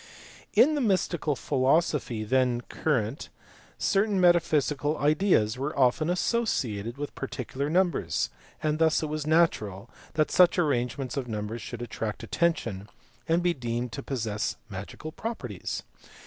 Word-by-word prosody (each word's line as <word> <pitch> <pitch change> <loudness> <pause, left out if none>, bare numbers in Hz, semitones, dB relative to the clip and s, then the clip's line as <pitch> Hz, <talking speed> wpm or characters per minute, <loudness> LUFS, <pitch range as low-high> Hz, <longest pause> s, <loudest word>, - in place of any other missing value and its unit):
In 305 +4 +6
the 295 - 0
mystical 180 - +1
philosophy 135 -3 +1
then 125 +1 +2
current - - -2 0.5
certain 200 0 +2
metaphy 175 -3 +4
sical 145 +1 -1
ideas 145 - +2
were 140 +3 -3
often 135 +5 +3
associated 130 - 0
with 145 0 -5
particular 135 +1 -4
numbers, 175 -1 +1 0.3
and 155 0 +1
thus 160 -1 +3
it 155 - -2
was 155 0 -3
natural 115 - +1 0.2
that 155 -1 +2
such 180 0 +5
arrangements 135 -4 0
of 130 -3 -2
numbers 110 +1 -4
should 120 +3 -6
attract 110 -2 -4
attention 110 - -1 0.4
and 170 +2 +3
be 175 -1 +3
deemed 120 -3 -3
to 140 - -5
possess 110 -6 -2 0.2
magical 100 +11 -7
properties. 130 - -5
140 Hz, 135 wpm, -27 LUFS, 120-170 Hz, 0.5 s, In